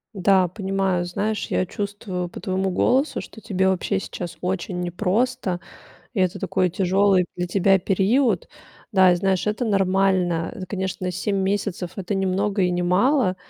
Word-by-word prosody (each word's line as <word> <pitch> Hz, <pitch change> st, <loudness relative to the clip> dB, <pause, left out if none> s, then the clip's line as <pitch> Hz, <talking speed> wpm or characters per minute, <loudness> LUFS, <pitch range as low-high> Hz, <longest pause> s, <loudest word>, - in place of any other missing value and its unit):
Да, 190 Hz, 0 st, +4 dB
понимаю. 190 Hz, -1 st, -1 dB
Знаешь, 205 Hz, +4 st, -2 dB
я 185 Hz, -, 0 dB
чувствую 195 Hz, -2 st, -4 dB
по -, -, -9 dB
твоему 190 Hz, 0 st, -1 dB
голосу, 255 Hz, -, +1 dB
что 220 Hz, -, -10 dB
тебе 190 Hz, -4 st, 0 dB
вообще 190 Hz, +1 st, 0 dB
сейчас 175 Hz, -3 st, -7 dB
очень 180 Hz, 0 st, -2 dB
непросто, 190 Hz, +2 st, -1 dB, 0.6 s
и 195 Hz, -, 0 dB
это 185 Hz, -1 st, +1 dB
такой 185 Hz, -2 st, 0 dB
тяжёлый 190 Hz, 0 st, +2 dB
для 180 Hz, 0 st, -2 dB
тебя 195 Hz, +1 st, +3 dB
период. 200 Hz, +3 st, +1 dB, 0.4 s
Да, 185 Hz, -3 st, +6 dB
и -, -, +2 dB
знаешь, 190 Hz, +2 st, 0 dB
это 215 Hz, +4 st, 0 dB
нормально. 190 Hz, -4 st, +1 dB
Это, 185 Hz, -, -5 dB
конечно, 185 Hz, -1 st, -3 dB
7 200 Hz, +2 st, -1 dB
месяцев- 195 Hz, -3 st, -2 dB
это 195 Hz, +1 st, -3 dB
не 195 Hz, 0 st, 0 dB
много 195 Hz, +1 st, 0 dB
и 180 Hz, -, +2 dB
не 175 Hz, 0 st, -1 dB
мало. 190 Hz, +2 st, +2 dB
190 Hz, 160 wpm, -23 LUFS, 180-200 Hz, 0.6 s, Да